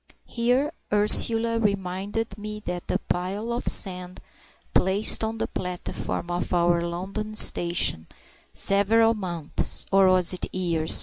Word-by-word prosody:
Here 250 +6 -1 0.2
Ursula 225 +2 +5
reminded 200 +1 -3
me 210 +1 -8
that 175 -3 -7
the - - -1
pile 195 +6 -5
of 240 - -5
sand 180 -2 0 0.5
placed 195 +4 +3
on 220 +1 -4
the - - -3
platform 180 -1 -6
of 175 0 -4
our 170 0 +1
London 195 +5 -6
station 170 - +2 0.4
several 225 +3 +2
months 175 -7 +1
(or 195 -1 +4
was 185 -1 +3
it 180 - -5
years?) 170 -4 +1
195 Hz, 125 wpm, -23 LUFS, 180-215 Hz, 0.5 s, Ursula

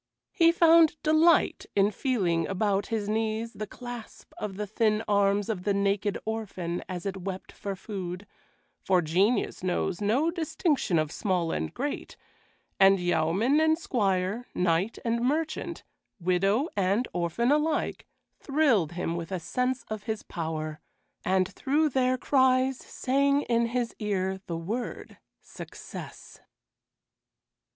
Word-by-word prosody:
He 335 -1 +5
found 335 -1 +6
delight 315 +2 +4
in 200 +1 +4
feeling 190 - 0
about 195 0 0
his 220 -3 -2
knees 220 +1 -1
the 215 - -5
clasp 245 0 -9
of 195 -3 -5
the 210 - -2
thin 215 +1 +1
arms 200 -1 +2
of 210 -5 -2
the 200 +1 0
naked 200 0 +1
orphan 200 -6 -3
as 180 -1 -5
it 195 -1 -3
wept 190 0 -6
for 200 -1 -5
food, 185 -1 -6 0.6
for 185 -2 +3
genius 195 +9 +1
knows 180 0 -1
no 255 +11 +2
distinction 315 - 0
of 155 -1 0
small 180 -5 0
and - - -2
great, 285 +4 -4 0.6
and 195 0 +6
yeoman 180 - +2
and 315 0 +3
squire, 205 - -1
knight 180 +4 +1
and 235 0 0
merchant, 305 +6 -1 0.4
widow 195 - +2
and 200 +5 +1
orphan 180 - 0
alike, 300 +1 0 0.3
thrilled 265 - +2
him 170 -1 -2
with 170 +1 -5
a 185 - -1
sense 250 +7 -1
of 215 -1 -7
his 220 -1 -3
power, 155 -3 -4 0.4
and 185 -1 +2
through 300 +7 +1
their 255 -1 +2
cries 260 0 +3
sang 280 +2 +1
in 235 -1 +1
his 240 0 -2
ear 190 -3 -1
the 170 -2 -3
word 215 +9 -5 0.2
"success." - - -10
210 Hz, 135 wpm, -28 LUFS, 185-255 Hz, 0.6 s, found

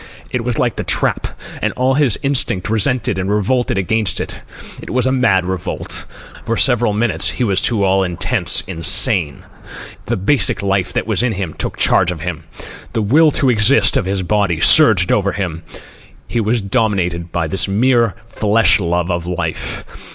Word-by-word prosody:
It 125 -2 -3
was 120 -1 -3
like 120 -2 -1
the - - -3
trap, - - -1 0.3
and - - -1
all 130 +1 0
his 135 -5 +2
instinct 130 -9 -1
resented 115 -1 0
it - - -1
and 95 - -4
revolted 105 +3 -1
against 100 -1 -1
it. - - -5 0.4
It - - -10
was 125 +1 0
a 130 - +1
mad 100 -8 +1
revolt. 95 -1 -3 0.4
For 115 +1 -3
several 120 -4 +2
minutes 105 -5 0
he 125 - -3
was 100 -4 0
to 110 -4 0
all 95 0 +2
intents 90 -2 +1
insane. 80 -3 +4 0.6
The - - -1
basic 100 -2 0
life 95 -2 -1
that - - -2
was 110 -2 -1
in 120 -2 -1
him 95 -5 -5
took - - -5
charge 90 - +2
of 85 -3 -5
him. 80 -1 -6 0.5
The 110 - -1
will 155 +10 +4
to 135 -3 +1
exist 115 +4 +3
of - - 0
his 95 0 -2
body 100 -3 -1
surged 105 - +6
over 100 -1 0
him. 90 -5 -5 0.7
He 120 - -3
was 110 +2 -1
dominated 95 -6 -2
by 85 -1 -2
this 85 +3 -1
mere 115 +2 +1
flesh 110 -2 +2
love 85 -1 -2
of 85 0 -4
life. 90 -1 -4
100 Hz, 180 wpm, -16 LUFS, 90-120 Hz, 0.7 s, surged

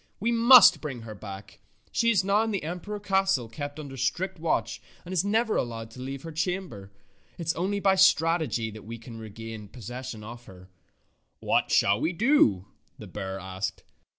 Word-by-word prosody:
We 230 +4 0
must 235 0 +8
bring 135 -6 -5
her 110 -1 -8
back. 100 -1 -10 0.3
She 230 - +2
is 200 -5 +3
now 200 +2 +3
in 225 - -1
the 200 -6 -2
imperial 180 +6 -5
cas 195 -1 +2
tle 120 -4 -4
kept 145 +5 -7
under 140 -3 -8
strict 165 +8 -2
watch, 115 -8 -1 0.2
and 180 - -6
is 180 -1 +2
never 220 +2 +1
allowed 115 -2 -4
to 125 - -12
leave 135 +1 -6
her 165 - -7
chamber. 165 - -4 0.5
It 170 - -6
is 160 - +1
only 195 +4 -1
by 195 -1 +3
strategy 165 - +3
that 110 0 -11
we 115 +2 -7
can 115 0 -11
regain 110 0 -8
possession 120 +1 -8
of 120 +2 -10
her." 90 0 -15 0.7
"What - - +1
shall 100 +4 +3
we 160 +4 0
do?" 175 - +3 0.3
the - - -10
bear 95 0 -6
asked. 95 +2 -5
140 Hz, 185 wpm, -27 LUFS, -, 0.7 s, must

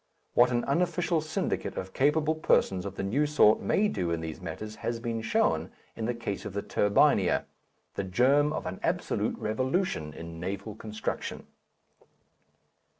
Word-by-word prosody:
What 120 +1 +6
an 120 -1 0
unofficial 170 +2 +1
syndicate 155 - -2
of 95 0 -5
capable 150 +3 +2
persons 95 - +2
of 100 - -7
the - - -3
new 135 +10 +1
sort 140 -8 +5
may 210 - +2
do 90 - -2
in 85 -1 0
these 80 +1 -6
matters 105 +6 -6
has 115 +1 -3
been 115 -1 -3
shown 110 - +1 0.3
in 110 - -3
the 120 +1 -1
case 100 -4 -4
of - - -6
the 100 - -2
Turbinia, 105 0 +3 0.5
the 100 - -2
germ 130 +10 +3
of - - -3
an 90 +1 -5
absolute - - -1
revolution 130 - -1
in 80 +1 -8
naval 100 +4 -4
construction. 110 +1 -5
110 Hz, 155 wpm, -29 LUFS, 95-145 Hz, 0.5 s, What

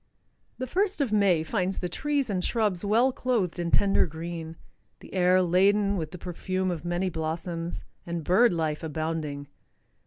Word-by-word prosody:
The 255 - -3
first 385 - 0
of 275 -6 0
May 195 -6 +3
finds 185 +2 -1
the 180 - -2
trees 280 - -1
and 185 -2 -1
shrubs 210 -6 0
well 230 +6 +3
clothed 230 -10 -1
in 170 -1 -1
tender 195 +1 +3
green, 165 0 -6 0.4
the - - -14
air 185 0 +4
laden 200 +3 +3
with 160 -5 -3
the 180 - -9
perfume 185 +1 -2
of 165 -3 -4
many 175 +2 -1
blossoms, 165 +1 -4 0.2
and 170 -1 -4
bird 205 +9 +4
life 160 -3 -1
abounding. 155 -2 -3
180 Hz, 160 wpm, -27 LUFS, 165-205 Hz, 0.4 s, air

